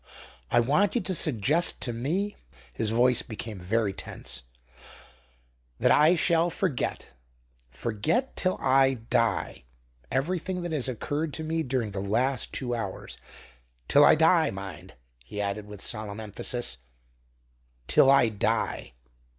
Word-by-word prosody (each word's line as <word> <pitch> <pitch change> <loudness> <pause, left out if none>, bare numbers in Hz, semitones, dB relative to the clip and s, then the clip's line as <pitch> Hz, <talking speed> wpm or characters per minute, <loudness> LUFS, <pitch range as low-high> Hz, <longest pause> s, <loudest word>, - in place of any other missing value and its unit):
I 120 - +4
want 150 - +2
you 240 - +2
to 185 0 -2
suggest 150 - +2
to 120 - -2
me" 175 - -2 0.4
his 110 - -1
voice 120 +2 +3
became 110 -2 -7
very 100 +3 0
tense 65 -8 -7 1.4
"that - - +3
I 155 +4 +5
shall 170 0 +2
forget 170 - -2 0.6
forget 115 - -1
till 185 0 0
I 135 0 +3
die 115 - -1 0.5
everything 180 +5 -1
that 175 - -4
has 145 -5 0
occurred 145 +5 -3
to 160 - -4
me 160 +1 -1
during 125 -6 -2
the 100 - -4
last 120 +6 0
two 120 -2 -3
hours; 110 -5 -5 0.7
till 145 - +6
I - - +7
die, 165 +1 +4
mind," 95 -1 -8 0.3
he 105 +12 -8
added, 105 +1 -3
with 105 -1 -9
solemn 105 -2 -3
emphasis, 110 +3 -2 1.1
"till 135 - +5
I 135 -4 +5
die." 100 - -2
125 Hz, 135 wpm, -27 LUFS, 105-160 Hz, 1.4 s, I